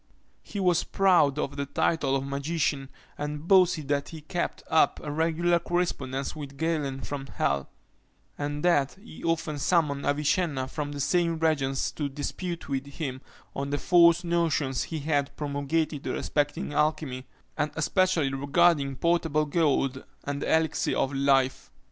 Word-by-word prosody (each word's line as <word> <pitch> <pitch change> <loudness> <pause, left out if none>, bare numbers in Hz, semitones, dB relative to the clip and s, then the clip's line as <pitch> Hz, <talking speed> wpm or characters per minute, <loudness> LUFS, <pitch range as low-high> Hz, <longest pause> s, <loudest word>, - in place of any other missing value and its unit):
He 205 - -7
was 180 -3 +3
proud 180 -8 +3
of 145 -1 -3
the 140 0 -2
title 140 -1 +1
of 135 0 -1
magician, 140 0 -1 0.3
and 150 +2 -4
boasted 180 -6 +4
that 140 -1 0
he 160 -2 -9
kept 170 +4 -3
up 160 - +3
a 150 - -4
regular 165 +3 +2
correspondence 140 -7 -2
with 140 -3 -8
Galen 150 -4 -1
from 140 -1 -5
hell; 70 - -1 0.7
and 145 +2 -3
that 145 -6 +3
he 195 -3 -13
often 160 -3 -1
summoned 150 -3 +1
Avicenna 145 -1 +1
from 145 +1 -4
the 145 - -6
same 170 +3 +1
regions 140 -4 0
to 145 -2 -3
dispute 165 +5 -5
with 135 0 -3
him 135 -3 -5 0.3
on 140 0 -3
the 145 - 0
false 170 +1 +5
notions 165 -6 0
he 160 -2 -5
had 145 -2 -1
promulgated 145 +1 -2
respecting 145 0 -1
alchymy, 150 -4 -1 0.3
and 150 - 0
especially 165 -3 +1
regarding 140 0 +2
potable 165 -1 +1
gold 140 -4 +1 0.2
and 140 0 -3
the - - -1
elixir 160 -1 +1
of 135 - 0
life. 135 -1 +2
150 Hz, 150 wpm, -27 LUFS, 140-165 Hz, 0.7 s, false